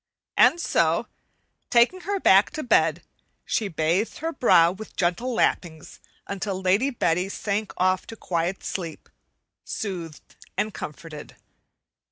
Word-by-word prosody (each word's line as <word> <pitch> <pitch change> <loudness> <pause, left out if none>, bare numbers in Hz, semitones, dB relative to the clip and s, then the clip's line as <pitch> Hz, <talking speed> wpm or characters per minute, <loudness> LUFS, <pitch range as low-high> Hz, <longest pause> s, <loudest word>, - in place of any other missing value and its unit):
And 345 - +5
so, 170 - +1 0.6
taking 245 +11 +3
her 395 +2 -2
back 195 - +5
to 310 - -4
bed, 245 - +2 0.4
she 215 - 0
"bathed 170 +4 0
her 325 +1 -3
brow" 170 -10 +5
with 215 +4 -10
gentle 180 +8 0
lappings 165 -8 -1 0.3
until 195 -1 -4
Lady 190 +8 +2
Betty 180 -7 0
sank 205 +1 -3
off 185 0 +1
to 225 - -8
quiet 175 -2 -2
sleep, 170 -4 -6 0.5
soothed 175 -8 -6 0.2
and 215 -1 -1
comforted. 150 0 -8
190 Hz, 125 wpm, -25 LUFS, 170-225 Hz, 0.6 s, And